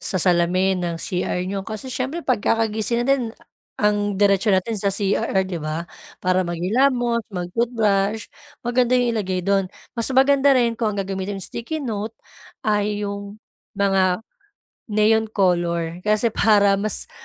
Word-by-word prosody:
sa - - -1
salamin 185 +1 +2
ng 170 -1 -2
CR 180 +1 -2
nyo 195 +1 -3
kasi 215 +6 -6
siyempre 270 +6 -3
pagkakagising 225 -1 0
natin 250 -4 0 0.4
ang 205 -1 +1
diretso 200 +1 +3
natin 200 +2 +1
sa 200 - +1
CR 195 -1 0
'di 185 -2 -4
ba 155 +2 -3 0.4
para 185 0 +3
magingilamos, 235 +8 +1
mag-toothbrush 205 +2 0 0.4
maganda 245 +1 +2
'yong 245 -1 +2
ilagay 190 -4 -1
do'n. 195 -1 +1 0.2
Mas 230 -2 0
maganda 270 +1 +4
rin 235 -2 +2
kung 220 -3 -2
ang 195 - -1
gagamitin 195 +1 -4
sticky 235 - -5
note 220 -1 -4 0.5
ay 210 -1 0
'yong 200 0 -6 0.4
mga 195 0 +2 0.6
neon 220 +1 +3
color 175 -5 0
kasi 215 +2 +2
para 205 -2 +4
mas 215 +1 -3
205 Hz, 135 wpm, -22 LUFS, 190-230 Hz, 0.6 s, maganda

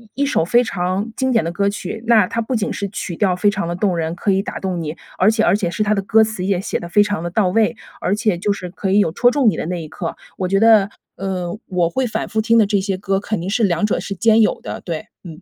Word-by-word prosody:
一 280 - 0
一 - - +2
首 275 - +1
非 240 +9 +3
常 190 0 -2
经 260 -1 0
典 225 -7 +2
的 170 - -2
歌 200 +3 0
曲， 205 +2 -6
那 220 -4 +5
它 230 +5 -2
不 240 +3 -2
仅 215 -2 -1
是 200 - -3
曲 185 -3 -5
调 185 -1 +1
非 205 +3 +2
常 200 -4 -3
地 170 - -3
动 180 0 0
人， 165 0 -2
可 200 +3 0
以 190 0 +2
打 - - -6
动 185 -3 -3
你， 155 0 -5 0.2
而 190 - +5
且 220 0 +1
而 - - +4
且 195 -5 -1
是 215 - -1
它 210 - +2
的 200 - 0
歌 220 +3 +4
词 220 -4 -3
也 190 -1 0
写 - - -3
得 170 - -8
非 205 +4 +5
常 205 -5 -2
地 175 - -3
到 185 +2 +1
位， 225 +4 +2 0.2
而 195 - 0
且 215 -5 0
就 205 - 0
是 185 -3 -4
可 195 0 -3
以 195 - +3
有 180 -6 +3
戳 245 +8 +3
中 260 -2 +2
你 - - -4
的 - - -4
那 175 -2 -3
一 - - -8
刻。 165 +2 -5 0.2
我 185 - -1
觉 195 +1 +2
得， 220 -3 +5 0.3
呃， 185 -1 -3
我 175 -2 +1
会 255 +8 -1
反 - - -3
复 220 -1 -1
听 230 +1 +3
的 220 - +5
这 200 0 +1
些 195 -1 -2
歌 195 0 -1
肯 205 -1 -3
定 180 - -5
是 225 +3 +1
两 175 +1 +1
者 210 - 0
是 195 - -5
兼 225 +3 +4
有 215 - +2
的， - - -6
对， 165 -3 -5 0.2
嗯。 165 0 -10
200 Hz, 320 characters per minute, -19 LUFS, 180-220 Hz, 0.3 s, 那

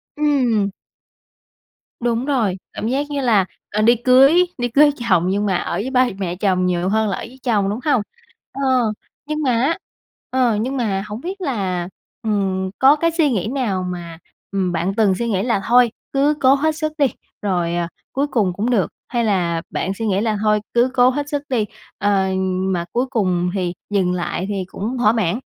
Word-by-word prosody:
Ừm. 255 -9 +2 1.3
Đúng 240 +1 0
rồi. 230 -10 0 0.2
Cảm 220 - -3
giác 280 +4 -1
như 285 -1 -2
là, 215 -7 +3 0.3
ờ, 215 - 0
đi 235 +3 +5
cưới 270 +9 +5
đi 245 - 0
cưới 290 +5 +5 0.2
chồng 175 -2 +4
nhưng 205 +2 0
mà 190 -3 +1
ở - - -2
với 205 +8 -2
ba 255 -1 +3
mẹ 180 -3 -3
chồng 185 -2 +1
nhiều 180 0 0
hơn 220 0 +1
là - - -2
ở - - -6
với 260 +3 -10
chồng, 205 -6 +1
đúng 210 - -2
hông? 285 -7 +3 0.5
Ờ, 275 - -6 0.6
nhưng 305 +1 -3
mà 260 - +2
á, 265 +9 +1 0.5
ờ, 250 -4 +2
nhưng 265 +3 -2
mà 200 -6 -1
hổng 210 +4 -6
biết 380 +3 -6
là, 190 - -2 0.3
ừm, 195 -3 -1
có 275 +3 +7
cái 335 +2 +1
suy 320 -3 +2
nghĩ 210 -3 -1
nào 225 -8 -1
mà, 175 -2 -6 0.3
ừm, 190 -2 0
bạn 175 +3 -1
từng 205 -4 +3
suy 235 +4 -2
nghĩ 195 -3 0
là 230 -5 0
thôi 245 -1 +5 0.2
cứ 280 +2 +3
cố 265 +1 +6
hết 315 +2 0
sức 310 -1 -2
đi 285 - +4 0.4
rồi, 175 -4 0
à, 170 -1 -1 0.2
cuối 280 +2 0
cùng 210 -10 +1
cũng 210 +7 -2
được, 210 -8 +2 0.2
hay 240 -2 -1
là 175 -5 +1
bạn 190 - -2
suy 225 +3 -4
nghĩ 195 0 +1
là 220 -2 0
thôi 210 0 +3
cứ 240 +2 +3
cố 250 0 +5
hết 290 +2 -3
sức 290 -1 -2
đi, 230 -5 +1 0.3
ờ, 200 -2 +2 0.5
mà 170 -1 -2
cuối 245 +2 +1
cùng 180 -7 0
thì 180 -3 -1 0.2
dừng 190 -3 +1
lại 180 +1 -2
thì 195 -2 -2
cũng 225 +7 -4
thỏa 215 -3 +4
mãn? 220 -2 0
220 Hz, 200 wpm, -20 LUFS, 190-260 Hz, 1.3 s, có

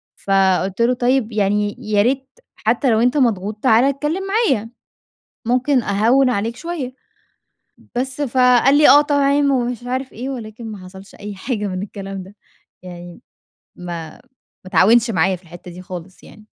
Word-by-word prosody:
فقُلت 195 +1 +1
له: 245 +2 +3
"طيب 245 -1 0
يعني 205 0 0
يا 210 -3 +1
ريت 265 +3 0 0.3
حتّى 240 +4 0
لو 220 - +3
أنت 250 +5 +2
مضغوط 215 -5 0
تعالَ 235 -1 +5
اتكلّم 295 +7 -1
معايا، 390 - +1 0.8
ممكن 255 +1 +2
أهوِّن 235 +7 +2
عليك 230 +1 -2
شوية." 320 -7 -5 1.0
بس، 260 +3 -3
فقال 255 +1 +4
لي: 300 - +6
"آه 290 - +8
طبعًا،" 285 -1 +1 0.2
ومش 245 -2 -2
عارف 260 +1 -4
إيه، 250 +5 -6
ولكن 230 -2 -8
ما 195 -3 -10
حصلش 190 +2 -13
أي 205 -1 -8
حاجة 210 0 -3
من 185 0 -4
الكلام 195 -1 -7
ده. 195 +3 -15 0.5
يعني 175 +1 -10 0.6
ما 170 -3 -6
ما - - -19 0.4
اتعاونش 225 +6 +4
معايا 185 +1 +1
في 180 - -16
الحتّة 175 +1 -12
دي 180 +1 -10
خالص 180 0 -10
يعني. 215 0 -16
225 Hz, 155 wpm, -19 LUFS, 195-260 Hz, 1.0 s, آه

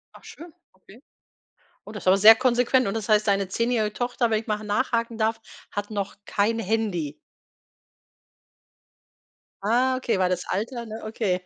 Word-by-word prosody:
Ach - - -16
schön, 335 0 -12 0.2
okay. 195 +5 -19 0.8
Oh, 210 - -10
das 210 - -9
aber 190 - +6
sehr 215 +3 +9
konsequent 245 +1 +2
und 195 - -3
das 220 -1 -4
heißt, 215 0 +3
deine 195 -1 +1
zehnjährige 230 0 0
Tochter, 245 0 -1
wenn 215 - +1
ich 225 - -15
mal 210 - 0
ha 215 - -10
nachhaken 230 +2 -1
darf, 220 0 0 0.3
hat 205 +1 -5
noch 200 -2 -4
kein 220 +3 0
Handy? 190 -9 -2 2.5
Ah, 250 +4 +2
okay, 250 -6 -1
weil 185 -1 +2
das 180 -1 -2
Alter, 235 +4 -3
ne, 220 0 -8
okay. 215 -4 -1
220 Hz, 160 wpm, -24 LUFS, 200-235 Hz, 2.5 s, sehr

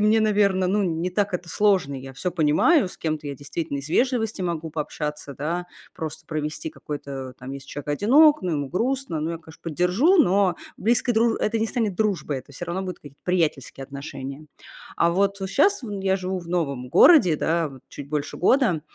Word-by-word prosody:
мне, 215 +1 +4
наверно, 200 -3 +2
ну, 205 +2 +2
не 175 -1 -1
так 200 +1 0
это 180 -1 -4
сложно, 190 -8 +2
я 135 +1 -9
всё 180 +8 -3
понимаю, 180 - +3
с - - -12
кем-то 155 -2 -3
я 140 - -4
действительно 145 +2 -4
из 140 +1 -7
вежливости 230 -2 +1
могу 165 -2 -3
пообщаться, 150 -1 -4
да, 170 +6 -3 0.3
просто 160 -2 -6
провести 155 0 -4
какой-то, 140 -4 -7
там, 125 +1 -8
если 140 0 -8
человек 145 0 -7
одинок, 280 - +5
ну, 180 -2 -1
ему 145 -3 -2
грустно. 235 - -1
Ну, 160 +2 -2
я, 165 - -4
конечно, 160 -1 -16
поддержу, 180 - +2
но 195 - +4 0.2
близкой 235 +3 +2
друж 225 +1 +3
это 225 +2 0
не 220 - +1
станет 220 -4 -1
дружбой, 190 -10 0
это 130 +2 -14
всё 160 - -6
равно 175 +2 -3
будут 185 -1 -5
какие-то 140 -1 -14
приятельские 160 -7 -1
отношения. 140 +1 -8 0.5
А 170 - +3
вот 195 +2 0
щас 390 - +3
в 230 - -6
я 190 0 +2
живу 185 0 -3
в 170 -2 -10
новом 140 -8 -2
городе, 185 - +7
да, 165 +1 0
вот 135 -2 -13
чуть 140 -1 -9
больше 150 -1 -3
года. 190 - +3
170 Hz, 195 wpm, -24 LUFS, 150-205 Hz, 0.5 s, городе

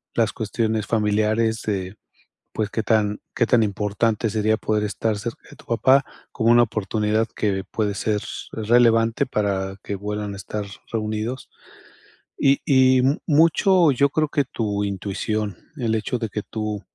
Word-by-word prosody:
las 115 -2 +1
cuestiones 110 0 -1
familiares 110 +1 +1
de, 95 -2 -3 0.6
pues, 110 -2 -1
que 110 - -2
tan 105 -2 +1
que 120 - +3
tan 120 -2 +4
importante 105 +2 0
sería 110 +1 +1
poder 105 -1 -1
estar 105 +1 -1
cerca 115 +3 -6
de - - -13
tu - - -18
papá, 130 +4 +4 0.3
como 115 -1 +2
una 120 0 +6
oportunidad 110 0 0
que 95 -3 -1
puede 105 -2 -1
ser 105 +1 0 0.3
relevante 115 +2 +3
para 95 -4 -1
que 100 - -4
vuelvan 105 +1 -4
a - - -9
estar 100 +2 -5 0.3
reunidos. 110 +3 -3 0.9
Y 140 0 +4
y 130 -2 +5
m 135 +4 +2
mucho, 165 +2 +4
yo 140 +2 +2
creo 155 +1 0
que 145 -2 +1
tu 105 -3 -2
intuición, 100 0 -3 0.2
el 115 -4 0
hecho 110 +3 -2
de 115 -2 -3
que 105 - -3
tú 105 -2 -4
110 Hz, 155 wpm, -22 LUFS, 105-120 Hz, 0.9 s, una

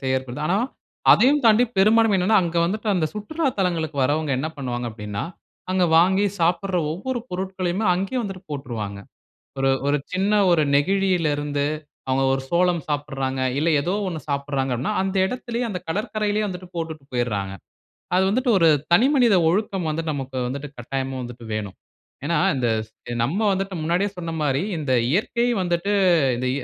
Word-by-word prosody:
செய்யப்படுது. 130 +1 -2
ஆனா 185 +4 +2 0.6
அதையும் 275 +7 +4
தாண்டி 225 +2 +6
பெரும்பான்மை 215 +2 +4
என்னனா, 205 +5 +3
அங்க 170 0 -3
வந்துட்டு 215 +4 -3
அந்த 170 -4 +1
சுற்றுலா 300 +10 -3
தலங்களுக்கு 165 -5 -1
வரவுங்க 145 +2 0
என்ன 155 +4 -2
பண்ணுவாங்க 125 -3 -3
அப்படினா, 105 -2 -5 0.5
அங்க 185 -1 +2
வாங்கி 190 +4 +4 0.2
சாப்பிடுற 180 +2 +1
ஒவ்வொரு 245 +9 -3
பொருட்களையுமே 185 +2 -2
அங்கேயே 195 +8 -2
வந்துட்டு 195 -3 -6
போட்றுவாங்க. 115 -8 -5 0.6
ஒரு 135 0 +2 0.2
ஒரு 145 +1 +3 0.2
சின்ன 195 +3 +1 0.2
ஒரு 165 -3 +4
நெகிழியில 180 +1 +2
இருந்து, 145 -1 -1 0.4
அவங்க 130 +1 +2
ஒரு 135 0 -1
சோளம் 175 -1 +2
சாப்பிடுறாங்க. 135 -3 -2 0.2
இல்ல 160 +3 +1
ஏதோ 175 +6 -1
ஒண்ணு 160 -3 -4
சாப்பிடுறாங்க 140 -2 -1
அப்படினா, 135 - -2
அந்த 195 0 -2
இடத்திலேயே 240 +1 -3
அந்த 180 -4 -4
கடற்கரையிலேயே 210 +3 -1
வந்துட்டு 180 -1 -7
போட்டுட்டு 160 -4 -5
போய்டுறாங்க. 105 -6 -1 0.6
அது 190 - +4
வந்துட்டு 245 +3 +1
ஒரு 165 -3 +5 0.2
தனி 235 +9 +6
மனித 235 -6 +5
ஒழுக்கம் 190 -2 -1
வந்து, 165 +2 -2
நமக்கு 135 -2 -5
வந்துட்டு 140 +3 -5
கட்டாயமா 135 +2 -3
வந்துட்டு 120 -1 -9
வேணும். 105 -3 -4 0.5
ஏன்னா 170 +1 +1 0.2
இந்த 120 -2 0 0.2
சே 120 +2 -11
நம்ம 165 +10 -1
வந்துட்டு 195 0 -2
முன்னாடியே 175 +5 +1
சொன்ன 165 -1 -4
மாரி, 140 +1 +1 0.2
இந்த 145 -4 -1 0.2
இயற்கை 235 +5 +1 0.2
வந்துட்டு 175 +3 0 0.4
இந்த 130 +1 -2
170 Hz, 155 wpm, -23 LUFS, 135-195 Hz, 0.6 s, தாண்டி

